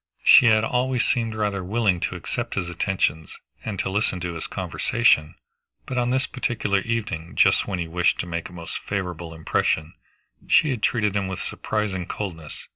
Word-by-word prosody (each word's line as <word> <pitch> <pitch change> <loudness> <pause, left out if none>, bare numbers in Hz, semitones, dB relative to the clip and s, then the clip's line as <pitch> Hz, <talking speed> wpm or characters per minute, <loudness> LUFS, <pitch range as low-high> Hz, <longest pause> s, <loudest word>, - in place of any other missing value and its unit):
She 125 - +8
had 110 -1 +5
always 125 +1 +1
seemed 115 -2 0
rather 105 -3 -1
willing 100 -2 +1
to 95 - -2
accept 120 +6 -4
his 90 -3 -2
attentions 85 -4 -1 0.3
and 105 -3 -4
to - - -1
listen 100 -2 0
to 90 -1 -3
his 80 - -5
conversation, 75 +2 +1 0.5
but 130 -2 -2
on 120 0 +1
this 130 +2 +1
particular 105 -6 -1
evening, 105 -7 -3
just - - +4
when 95 - -2
he 85 -1 -3
wished 90 +2 +1
to - - -6
make 85 -1 -4
a - - -14
most 85 -2 -6
favorable 90 -4 -4
impression, 80 0 0 0.5
she 150 - +5
had 120 -5 -3
treated 105 -4 +1
him 100 -1 0
with 95 -1 -4
surprising 100 -4 -3
coldness. 80 -8 -6
95 Hz, 180 wpm, -24 LUFS, 85-115 Hz, 0.5 s, She